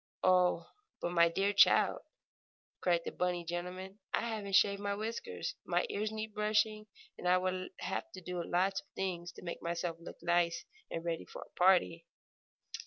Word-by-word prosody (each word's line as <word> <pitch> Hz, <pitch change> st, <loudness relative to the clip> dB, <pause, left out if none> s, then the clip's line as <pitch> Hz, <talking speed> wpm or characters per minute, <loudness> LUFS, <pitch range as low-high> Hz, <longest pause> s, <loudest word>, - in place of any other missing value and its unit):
"Oh, 180 Hz, -2 st, +4 dB, 0.3 s
but 175 Hz, -, -2 dB
my 170 Hz, -1 st, +5 dB
dear 195 Hz, +4 st, +1 dB
child!" 200 Hz, -, +5 dB, 0.8 s
cried 175 Hz, -2 st, +3 dB
the -, -, -3 dB
bunny 180 Hz, -1 st, -1 dB
gentleman. 180 Hz, +3 st, -5 dB, 0.2 s
"I -, -, 0 dB
haven't 215 Hz, -4 st, -2 dB
shaved 200 Hz, 0 st, +4 dB
my 200 Hz, 0 st, -1 dB
whiskers, 230 Hz, -, -4 dB
my -, -, +1 dB
ears 215 Hz, +1 st, -1 dB
need 220 Hz, 0 st, -5 dB
brushing, 215 Hz, 0 st, +1 dB, 0.3 s
and -, -, -3 dB
I 180 Hz, +1 st, +6 dB
would 185 Hz, 0 st, -2 dB
have -, -, -3 dB
to 185 Hz, -, -8 dB
do 180 Hz, 0 st, -4 dB
lots 190 Hz, +3 st, +1 dB
of -, -, -32 dB
things 175 Hz, -2 st, -3 dB
to -, -, -12 dB
make 170 Hz, -, -5 dB
myself 170 Hz, 0 st, -2 dB
look 170 Hz, -, -10 dB
nice 170 Hz, -1 st, +2 dB, 0.2 s
and 165 Hz, 0 st, -4 dB
ready 165 Hz, -1 st, -2 dB
for -, -, -9 dB
a -, -, -22 dB
party!" 175 Hz, -2 st, +3 dB
185 Hz, 175 wpm, -33 LUFS, 175-205 Hz, 0.8 s, I